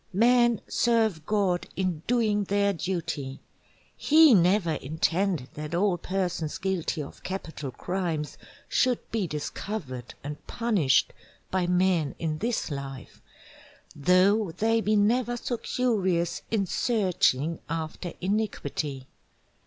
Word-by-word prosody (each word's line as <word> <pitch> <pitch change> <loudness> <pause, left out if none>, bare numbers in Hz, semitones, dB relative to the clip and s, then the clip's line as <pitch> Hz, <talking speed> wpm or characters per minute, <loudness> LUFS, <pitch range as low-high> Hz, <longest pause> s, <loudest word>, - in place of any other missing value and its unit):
Men 240 +1 +4
serve 220 -9 +1
God 195 -4 +1
in 180 -4 -1
doing 215 -4 +2
their 200 +1 +2
Duty, 160 -7 -3 0.6
he 310 -2 +6
never 180 -1 +4
intended 160 +1 -1
that 150 +2 -5
all 180 -1 +2
persons 180 -4 -2
guilty 185 -5 -2
of 140 - -12
Capital 160 -7 -5
Crimes 165 +1 -3 0.3
should 250 -2 +2
be 215 -5 0
discovered 150 - -5
and 145 +1 -7
punished 205 - +2 0.4
by 185 -2 +1
men 180 -5 +2
in 155 -2 -2
this 230 -6 -1
Life, 135 -2 -7 0.7
though 185 +7 +3
they 225 +6 +1
be 215 0 +2
never 240 +4 +2
so 240 0 -3
curious 190 -10 0
in 210 -3 +1
searching 180 - +1
after 165 +2 -4
Iniquity. 160 -9 -2
185 Hz, 115 wpm, -27 LUFS, 155-215 Hz, 0.7 s, he